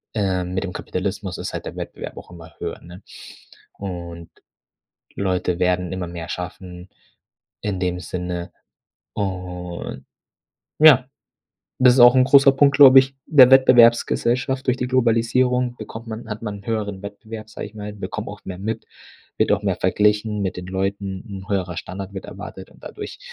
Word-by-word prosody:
äh, 95 -4 0
mit 90 +1 -3
dem 90 -2 -5
Kapitalismus 95 0 -4
ist - - -5
halt - - -5
der - - -7
Wettbewerb - - -7
auch - - -11
immer 80 -2 -13
höher, 85 -1 -5
ne? 90 +3 -13 0.7
Und 85 -3 -7 0.9
Leute 90 -2 -1
werden 90 -1 0
immer 95 -2 -4
mehr 85 -1 -7
schaffen 90 0 -7 0.7
in 100 -3 -3
dem 90 -1 -1
Sinne. 90 -1 -5 0.6
Und 90 -3 -5 0.7
ja, 140 -5 +7 0.7
das 125 -1 +6
ist 130 - +3
auch 120 0 +9
'n 130 -1 +5
großer 135 0 +6
Punkt, 140 +1 +3
glaube 135 -2 +9
ich, 135 +1 -5
der 130 -5 +7
Wettbewerbsgesellschaft. 130 0 +4
Durch 125 -1 +2
die 125 -1 -2
Globalisierung 125 0 +1
bekommt 110 +1 -9
man 110 +1 -7
hat 105 +1 -6
man 105 -2 -5
'n - - -20
höheren 105 -4 -3
Wettbewerb, 110 +2 -9
sage - - -7
ich 105 - -14
mal, 105 -1 -7
bekommt 105 - -6
auch - - -9
mehr 90 -1 -7
mit, 110 +3 -4 0.5
wird - - +2
auch - - +1
mehr - - 0
verglichen 105 0 +1
mit 95 - -3
den 90 - -7
Leuten, 95 +1 -3 0.2
'n - - -20
höherer 95 -4 -2
Standard 95 +2 -7
wird 95 - -7
erwartet - - -9
und - - -21
dadurch - - -8
100 Hz, 165 wpm, -21 LUFS, 90-120 Hz, 0.9 s, auch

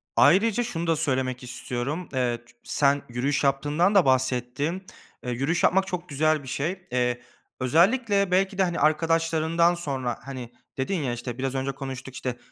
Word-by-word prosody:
Ayrıca 220 +5 +4
şunu 170 -8 -3
da 165 - +3
söylemek 130 -4 -1
istiyorum: 125 +6 -4
Eee, 125 -2 0
ç 120 - -22 0.2
sen 140 0 +2
yürüyüş 135 +4 -1
yaptığından 145 +8 +2
da 190 -6 +6
bahsettin. 130 +6 0 0.4
E, 125 - -3
yürüyüş 135 +8 0
yapmak 190 +1 +3
çok 180 0 -5
güzel 155 +1 +1
bir - - -11
şey. 175 +8 -3
Eee, 125 -1 0 0.4
özellikle 200 - +3
belki 190 +1 +2
de 195 - +4
hani, 175 -2 -1
arkadaşlarından 165 +2 +2
sonra, 135 -8 -3
hani, 130 -3 -7 0.3
dedin 135 +9 -1
ya: 125 - -1
"İşte, 120 0 -6
biraz 135 0 -2
önce 135 +1 -1
konuştuk, 135 -1 -7
işte, 125 -1 -4
145 Hz, 165 wpm, -25 LUFS, 130-175 Hz, 0.4 s, da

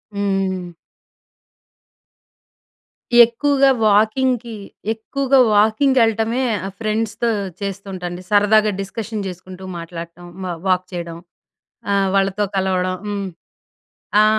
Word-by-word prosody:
హ్మ్. 195 -3 -1 2.5
ఎక్కువగా 275 +3 +2 0.2
వాకింగ్‌కి, 230 +3 +2 0.4
ఎక్కువగా 270 +4 +1
వాకింగ్‌కెల్లటమే 225 +2 +3 0.2
ఆహ్, 195 - -6
ఫ్రెండ్స్‌తో 225 +1 -1 0.3
చేస్తుంటాండి. 190 -3 -5
సరదాగా 210 +1 +4
డిస్కషన్ 210 +1 -5
చేసుకుంటూ 185 +1 -9
మాట్లాడటం 170 +1 -8 0.2
హ్మ్ 180 -2 -3
వాక్ 185 0 +2
చేయడం, 170 -1 -5 0.7
ఆహ్, 195 -1 +2
వాళ్ళతో 195 +1 +1
కలవడం. 185 -1 0
హ్మ్, 200 -1 -3 1.0
ఆ! - - +5
200 Hz, 85 wpm, -20 LUFS, 185-225 Hz, 2.5 s, ఆ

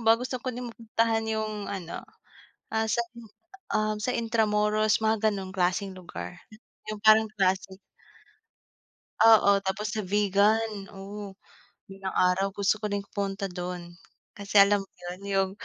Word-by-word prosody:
ba 225 0 +7
gusto 255 +2 -4
ko 265 - -3
din 245 0 -6
mapuntahan 225 0 0
'yung 215 -2 -3
ano, 180 -4 -5 0.7
ah, 220 0 0
sa, 230 +2 +1 0.7
ah, 215 0 +1
sa 250 +4 -1
Intramuros 215 -2 +2
mga 220 0 +2
gano'ng 190 -2 -5
klaseng 190 +2 0
lugar, 180 0 -8 0.5
'yung 215 -1 -4
parang 220 0 +7
klasik. 190 -1 0 1.5
Oo, 200 -3 +7
tapos 205 +2 -1
sa 220 - -4
Vigan, 205 +1 +2
oh 200 +1 -8 0.5
balang 195 -1 -6
araw 180 +2 +3
gusto 200 +1 +1
ko - - -8
ring 205 - 0 0.2
pumunta 195 0 -2
dun. 175 -1 -6 0.4
Kasi 200 0 +3
alam 200 0 +5
mo - - -26
'yun 180 +1 -7
'yung 195 -1 +1
205 Hz, 140 wpm, -27 LUFS, 195-220 Hz, 1.5 s, ba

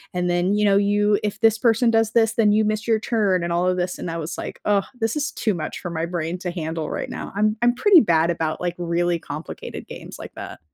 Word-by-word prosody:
And 180 0 0
then, 175 +3 +1
you 210 0 +2
know, 200 -1 +4
you 205 +1 +2
if 210 +2 -3
this 225 -1 +4
person 230 0 +3
does 225 -1 +2
this, 225 -1 +3
then 220 -2 +3
you 215 +1 +3
miss 215 +2 -2
your 220 -1 +3
turn 205 -6 +1
and 170 0 -1
all 175 +1 +1
of 185 0 +1
this. 180 0 -2
And - - -4
I 165 - -3
was 160 0 -5
like, - - -7
"Oh, 205 -1 +3 0.2
this 225 0 0
is 290 -1 -1
too 215 - -1
much 165 -4 -5
for 175 - -6
my 165 0 -2
brain 170 0 -3
to 180 -1 -4
handle 160 -2 -4
right - - -4
now." - - -6
I'm 215 +1 +2
I'm 240 0 +3
pretty 390 +3 +6
bad 170 - +2
about, 160 -2 -2
like, 175 -1 -1
really 175 0 0
complicated 155 +1 -8
games - - -9
like - - -10
that. - - -8
195 Hz, 255 wpm, -22 LUFS, 170-220 Hz, 0.2 s, pretty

